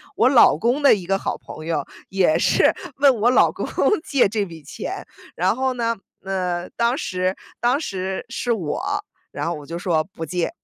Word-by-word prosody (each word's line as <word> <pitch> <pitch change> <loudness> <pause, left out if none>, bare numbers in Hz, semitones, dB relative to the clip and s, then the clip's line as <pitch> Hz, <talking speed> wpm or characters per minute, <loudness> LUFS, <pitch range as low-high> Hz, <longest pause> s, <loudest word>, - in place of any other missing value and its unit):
我 - - +4
老 255 - +6
公 240 - +1
的 280 - +7
一 190 -4 -7
个 195 +2 +1
好 - - -3
朋 155 - -10
友 155 -4 -1 0.2
也 190 -5 +2
是 - - +4 0.2
问 275 -2 +5
我 235 - +5
老 250 - +5
公 - - -5 0.4
借 275 - +3
这 210 +1 -1
笔 165 -5 -9
钱。 - - -6 0.3
然 185 +4 +1
后 260 +1 0
呢， 230 -1 0 0.3
呃， 180 -2 -2
当 235 +2 +1
时 185 - -1 0.2
当 245 +4 +2
时 190 - -4
是 245 - -2
我， 175 -9 -3 0.5
然 - - -4
后 170 - -1
我 150 -3 -9
就 170 - -5
说： 170 -3 +1
“不 165 - -5
借。” 175 +1 -1
190 Hz, 205 characters per minute, -22 LUFS, 175-240 Hz, 0.5 s, 的